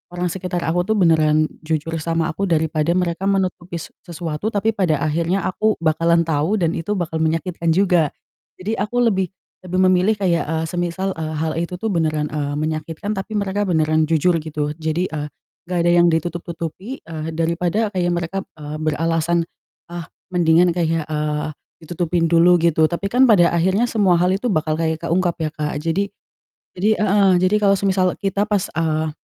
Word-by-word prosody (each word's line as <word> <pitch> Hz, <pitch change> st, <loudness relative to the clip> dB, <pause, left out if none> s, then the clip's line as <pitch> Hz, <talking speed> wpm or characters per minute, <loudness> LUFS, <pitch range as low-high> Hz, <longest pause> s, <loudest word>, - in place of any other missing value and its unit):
orang 180 Hz, 0 st, -1 dB
sekitar 180 Hz, -2 st, -3 dB
aku 175 Hz, +3 st, 0 dB
tuh 220 Hz, -, +2 dB
beneran 155 Hz, -4 st, +4 dB, 0.2 s
jujur 160 Hz, 0 st, -2 dB
sama 165 Hz, 0 st, -1 dB
aku 195 Hz, +5 st, -4 dB
daripada 160 Hz, -1 st, 0 dB
mereka 180 Hz, 0 st, -1 dB
menutupi 185 Hz, -3 st, -1 dB
se -, -, -9 dB
sesuatu, 170 Hz, +2 st, -4 dB
tapi 215 Hz, +2 st, +1 dB
pada 180 Hz, -8 st, 0 dB
akhirnya 170 Hz, +5 st, 0 dB
aku 215 Hz, +3 st, +1 dB
bakalan 165 Hz, +1 st, +3 dB
tahu 160 Hz, +5 st, 0 dB
dan 165 Hz, -2 st, +1 dB
itu 190 Hz, +6 st, -2 dB
bakal 165 Hz, -3 st, -2 dB
menyakitkan 165 Hz, +2 st, -1 dB
juga. 180 Hz, -5 st, +3 dB, 0.5 s
Jadi, 215 Hz, +4 st, -2 dB
aku 210 Hz, +5 st, 0 dB
lebih 190 Hz, -5 st, +2 dB, 0.4 s
lebih 185 Hz, +1 st, -2 dB
memilih 185 Hz, +4 st, +3 dB
kayak, 175 Hz, -5 st, +1 dB
eee, 160 Hz, 0 st, -1 dB
semisal, 175 Hz, +2 st, -2 dB
eee, 155 Hz, 0 st, -3 dB
hal 160 Hz, +1 st, -1 dB
itu 170 Hz, +1 st, -3 dB
tuh 225 Hz, -, -7 dB
beneran, 155 Hz, -2 st, 0 dB
eee, 145 Hz, -1 st, -2 dB
menyakitkan, 160 Hz, +6 st, -3 dB
tapi 200 Hz, +2 st, -5 dB
mereka 200 Hz, 0 st, -1 dB
beneran 155 Hz, -2 st, +2 dB
jujur 165 Hz, +2 st, +3 dB
gitu. 150 Hz, -1 st, -3 dB
Jadi, 160 Hz, +3 st, -2 dB
eee, 150 Hz, -3 st, -4 dB, 0.4 s
enggak 180 Hz, -, -1 dB
ada 175 Hz, -, +4 dB
yang 175 Hz, 0 st, +5 dB
ditutup-tutupi, 170 Hz, -, -4 dB
eee, 160 Hz, -1 st, -6 dB
daripada 175 Hz, +6 st, 0 dB
kayak 175 Hz, -2 st, 0 dB
mereka, 175 Hz, +2 st, -2 dB, 0.2 s
eee, 150 Hz, 0 st, -6 dB
beralasan, 165 Hz, +2 st, 0 dB, 0.4 s
ah, 170 Hz, -1 st, -8 dB, 0.2 s
mendingan 170 Hz, 0 st, +4 dB
kayak, 165 Hz, -2 st, 0 dB
eee, 150 Hz, 0 st, -2 dB, 0.3 s
ditutupin 170 Hz, +1 st, -1 dB
dulu 170 Hz, +2 st, +5 dB
gitu. 160 Hz, -2 st, +3 dB
Tapi 175 Hz, +3 st, -4 dB
kan 250 Hz, +4 st, +4 dB
pada 175 Hz, -5 st, +5 dB
akhirnya 190 Hz, +7 st, +2 dB
semua 205 Hz, -7 st, +2 dB
hal 180 Hz, +2 st, +2 dB
itu 225 Hz, +6 st, -1 dB
bakal 155 Hz, -5 st, 0 dB
kayak 160 Hz, -1 st, 0 dB
keungkap 175 Hz, 0 st, +1 dB
ya, 155 Hz, -, 0 dB
Kak. 150 Hz, -1 st, -3 dB
Jadi 165 Hz, +6 st, -1 dB, 0.7 s
jadi 205 Hz, +4 st, +2 dB
heeh, 200 Hz, -2 st, +4 dB
jadi 185 Hz, +3 st, +3 dB
kalau 200 Hz, -1 st, +4 dB
semisal 185 Hz, -2 st, +1 dB
kita 200 Hz, +1 st, -1 dB
pas, 205 Hz, -3 st, 0 dB
eee, 155 Hz, -1 st, 0 dB
170 Hz, 170 wpm, -20 LUFS, 160-190 Hz, 0.7 s, yang